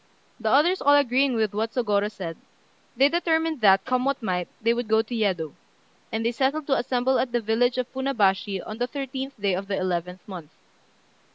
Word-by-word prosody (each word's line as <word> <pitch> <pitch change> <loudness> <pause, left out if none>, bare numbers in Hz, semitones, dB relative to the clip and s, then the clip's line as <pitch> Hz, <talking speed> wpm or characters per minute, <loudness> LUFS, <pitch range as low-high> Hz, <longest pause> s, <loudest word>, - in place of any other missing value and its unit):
The 220 -1 -1
others 315 +9 +3
all 285 +1 +5
agreeing 270 -1 +3
with 215 -2 0
what 220 +2 -2
Sôgorô 210 -4 +1
said, 175 -6 -6 0.6
they 270 +2 +6
determined 320 -2 0
that, 195 -2 +5
come 255 -1 0
what 275 -2 -1
might, 180 -3 -1
they 230 +1 +2
would 240 -1 -3
go 220 +1 +3
to 235 - -9
Yedo; 185 -9 -1 0.6
and 225 0 -2
they 235 - +2
settled 275 +5 0
to 275 - +2
assemble 250 +1 +1
at 250 - -1
the 240 - +1
village 235 +3 +1
of 255 - 0
Funabashi 205 -8 0
on 215 +2 -7
the 245 - 0
thirteenth 270 -1 -6
day 200 -2 +1
of 195 +2 -3
the 200 - -2
eleventh 180 0 -3
month. 175 -7 -8
235 Hz, 195 wpm, -25 LUFS, 200-265 Hz, 0.6 s, they